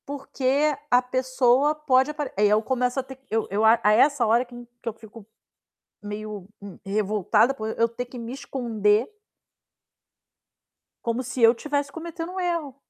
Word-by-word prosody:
Porque 280 +1 0
a 245 0 +5
pessoa 255 +3 +2
pode 275 -2 +2
apare 295 -1 -5
aí 205 0 +4
eu 210 +1 +3
começo 250 +2 -1
a - - -2
ter 265 0 -12
eu 225 0 0
eu 205 +2 0
a 220 +1 +6
a 210 - +5
essa 275 +3 +4
hora 230 +3 +3
que 245 0 -14 0.3
que 235 - -3
eu - - -6
fico 220 -1 -14 0.8
meio, 210 -2 -6 0.2
hum, 200 -2 -10
revoltada 210 +4 +2
por 220 -4 -5
e - - -4
eu 230 - +3
ter 235 +2 -5
que 245 +1 -10
me 235 +1 -6
esconder 230 -5 0 2.0
como 235 +2 -1
se 255 0 -5
eu 230 0 +7
tivesse 285 +2 -2
cometendo 330 +1 -6
um 375 - -5
erro. 335 -7 -2
245 Hz, 170 wpm, -24 LUFS, 220-275 Hz, 2.0 s, eu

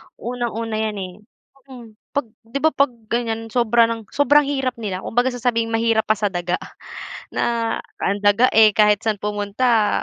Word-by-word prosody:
unang-una 230 -2 -4
yan, 215 -1 -1
eh, 185 -1 -6 0.6
mm. 235 -3 -11 0.3
'Pag 285 - +1 0.2
'di 275 - -3
ba, 315 - +4
'pag 280 -1 +3 0.2
ganiyan 225 -1 -1
sobra 235 -1 +4
ng 225 -3 -5
sobrang 290 +1 +4
hirap 270 -3 -1
nila 190 -3 -4
kumbaga 245 +3 +1
sasabihing 240 -2 -1
"Mahirap 225 0 +2
pa 215 -1 +2
sa 205 -2 -1
daga." 175 0 -1 0.7
na, 230 -1 -1 0.2
ang 200 +1 0
daga, 205 +5 +4
eh, 215 -2 +5
kahit 210 -1 +4
saan 210 -3 0
pumunta, 210 +2 +1
225 Hz, 160 wpm, -21 LUFS, 210-245 Hz, 0.7 s, eh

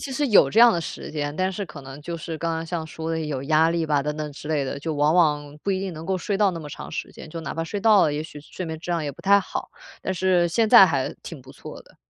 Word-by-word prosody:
其 275 - -6
实 290 +2 0
有 215 -6 +5
这 220 - +1
样 235 0 +8
的 170 - -1
时 165 - -7
间， 145 -1 -3
但 185 0 0
是 200 +2 -4
可 150 -4 -11
能 135 +2 -10
就 170 +2 -5
是 165 0 -6
刚 165 +1 -2
刚 165 0 -4
像 165 -1 -3
说 160 +1 -6
的 165 0 -1
有 150 -4 -3
压 155 +2 +3
力 165 -1 -1
吧 145 -2 +1
等 150 +1 -3
等 150 -1 -5
之 145 +1 -10
类 150 -3 0
的， 135 - -4
就 160 +1 -3
往 150 +2 +2
往 150 -4 +2
不 200 - -1
一 190 - 0
定 190 -1 -4
能 160 0 -8
够 190 +1 -1
睡 200 +3 -2
到 205 -1 +3
那 170 - -6
么 155 -2 -8
长 - - -8
时 - - -5
间， 155 - -11
就 165 - -6
哪 - - -5
怕 165 - -2
睡 205 +5 -4
到 215 -2 +5
了， 150 - +2
也 150 - -2
许 150 -2 -10
睡 175 +4 -7
眠 160 0 -4
质 175 - -6
量 170 -3 -1
也 145 - -3
不 - - -15
太 200 +1 +5
好， 195 - -5 0.3
但 190 - -2
是 185 -1 +2
现 220 +6 +1
在 - - +10
还 - - -1
挺 - - -9
不 - - -14
错 - - -10
的。 - - -23
165 Hz, 335 characters per minute, -24 LUFS, 150-185 Hz, 0.3 s, 在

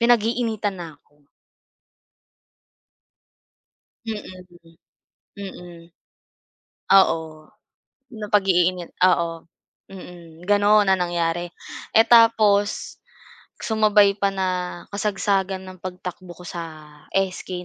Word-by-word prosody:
pinag-iinitan 225 -4 +1
na 165 -3 -9
ako. 145 -1 -34 2.8
Mm, 220 -2 -4 0.3
mm. 170 -1 -20 0.6
Mm. 180 -3 -9 1.2
Oo. 160 -4 0 0.7
Napag-iinit 185 -4 +1
oo. 170 -3 +1 0.4
Mm, 175 -3 -12
gano'n 205 0 +4
ang 190 -1 +2
nangyari. 170 0 -2 0.4
Eh, 225 +1 +5
tapos 220 -3 +3 0.6
sumabay 210 -2 +3
pa 200 - +2
na 190 -1 -1 0.4
kasagsagan 195 -2 -1
ng 185 0 -11
pagtakbo 180 -1 -8
ko 180 - -13
sa 170 -1 -6 0.5
SK 185 -1 -3
190 Hz, 80 wpm, -22 LUFS, 175-205 Hz, 2.8 s, Eh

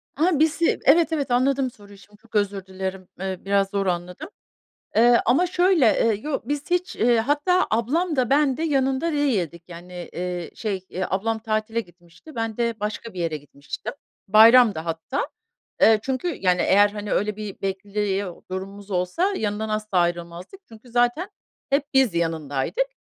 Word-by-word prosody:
Aha, 320 0 +2
bizi. 320 +2 +2
Evet, 330 -1 +5
evet, 280 -5 -1
anladım 260 +1 +2
soruyu 205 -2 -16
şimdi 205 +1 -19
çok 225 0 -19
özür 200 -2 0
dilerim, 190 0 -5
eee, 190 -1 -3
biraz 200 0 +2
zor 200 -1 -1
anladım. 180 - -3 0.7
Eee, 235 +1 +5
ama 280 +10 +3
şöyle, 355 -5 +3
eee, 225 0 +3
yo 300 -2 -2
biz 290 +3 -3
hiç, 360 0 0
eee, 235 +1 +3
hatta 295 +10 +2
ablam 300 +10 0
da 255 -3 +1
ben 280 -2 +3
de 320 - -2
yanında 270 +1 +1
değildik. 190 - 0
Yani, 175 +1 -9
iii, 180 -1 -4
şey, 195 -4 -4
eee, 185 +1 -3
ablam 220 +4 -1
tatile 220 0 -1
gitmişti, 175 - -17
ben 225 -1 -3
de 235 -2 -1
başka 215 +1 -4
bir 180 - -7
yere 165 -2 -1
gitmiştim. 140 0 -8 0.3
Bayramdı 220 -1 +7
hatta. 165 - -3 0.5
Eee, 220 -1 +6
çünkü 265 +6 -2
yani 180 -2 +2
eğer, 205 +1 +5
hani, 205 0 -5
öyle 210 0 0
bir 210 -2 -7
bekliyor 195 -1 -3
durumumuz 195 +2 -7
olsa 185 - 0
yanından 215 +1 -2
asla 215 -3 -1
ayrılmazdık. 175 - -2
Çünkü 225 +2 -15
zaten 245 - +1 0.4
hep 280 +1 +2
biz 265 -8 +4
yanındaydık. 165 - -1
215 Hz, 160 wpm, -23 LUFS, 185-265 Hz, 0.7 s, Bayramdı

